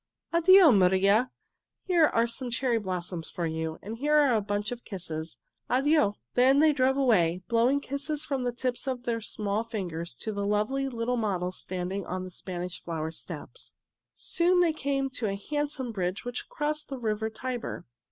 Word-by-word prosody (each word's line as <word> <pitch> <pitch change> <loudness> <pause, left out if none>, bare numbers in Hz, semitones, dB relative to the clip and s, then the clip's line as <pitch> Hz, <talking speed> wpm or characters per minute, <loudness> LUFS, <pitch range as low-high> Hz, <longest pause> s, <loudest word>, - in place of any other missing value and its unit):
"Addio, 340 - +7
Maria! 195 +5 +4 0.5
Here 345 -4 +4
are 230 -3 +2
some 240 +2 -3
cherry 240 -1 +1
blossoms 180 -4 -4
for 175 -3 -3
you, 160 0 -3
and 220 +3 -6
here 295 0 +4
is - - +3
a 215 - +2
bunch 205 +1 -2
of 245 -1 -6
kisses. 160 - -6 0.3
Addio!" 265 -5 +3 0.2
Then 260 +2 +5
they 305 +1 +5
drove 265 -1 +2
away, 185 -10 +3
blowing 245 +4 +3
kisses 285 +2 -3
from 270 -3 -2
the 245 - 0
tips 245 +2 -2
of 255 -2 -2
their 230 -2 -1
small 210 -1 -2
fingers 175 - -5
to 220 - -4
the 200 0 -2
lovely 220 +7 0
little 240 0 -1
model 185 -5 -1
standing 185 +1 -4
on 185 +1 -3
the 185 - -8
Spanish 180 0 -6
Flower 160 -2 -3
Steps. 160 - -9 0.4
Soon 355 +1 +2
they 340 -3 +4
came 275 -2 -1
to 245 -4 -2
a 195 - -1 0.2
handsome 290 -4 -1
bridge 185 0 -3
which 245 0 -5
crossed 300 +1 -2
the 270 - -4
river 220 -2 -1
Tiber. 245 +2 -5
230 Hz, 175 wpm, -28 LUFS, 190-270 Hz, 0.5 s, Addio